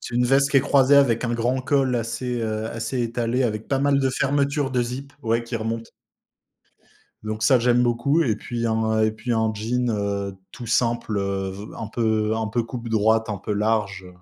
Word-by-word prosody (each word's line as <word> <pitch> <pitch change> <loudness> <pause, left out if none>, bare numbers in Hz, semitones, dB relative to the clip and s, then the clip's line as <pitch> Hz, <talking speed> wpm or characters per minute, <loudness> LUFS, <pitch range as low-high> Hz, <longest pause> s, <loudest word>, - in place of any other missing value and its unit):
C'est 120 - -7
une 125 0 +2
veste 140 +2 +3
qui 140 - +5
est - - +2
croisée 140 0 +4
avec 125 -4 +3
un 120 - -1
grand 120 +3 0
col 135 -3 +1
assez, 120 +1 -3
heu, 110 0 -2
assez 115 +3 -3
étalé, 120 +2 -1
avec 110 -1 -3
pas 135 - +1
mal 140 0 +2
de 135 -1 +1
fermetures 140 +1 0
de 125 -2 +1
zip, 130 +4 -6
ouais, 115 +1 +1
qui 115 0 -4
remontent. 115 +1 -4 1.3
Donc 110 0 -4
ça, 130 +3 +5
j'aime 125 +1 +3
beaucoup 120 +7 +2
et 110 -7 +1
puis 115 +2 -4
un 110 -1 +1
et 110 0 +3
puis 110 +3 -5
un 110 -1 +1
jean, 120 +3 -1
heu, 100 -2 -2 0.2
tout 120 - -9
simple, 115 -2 0
heu, 95 -1 -2
v 100 +2 -8
un 115 - -4
peu 110 -1 0
un 110 -1 -2
peu 115 +2 -1
coupe 115 0 -7
droite, 110 +1 +2
un 105 - -2
peu 105 - -4
large. 100 -3 -1
115 Hz, 205 wpm, -23 LUFS, 110-125 Hz, 1.3 s, qui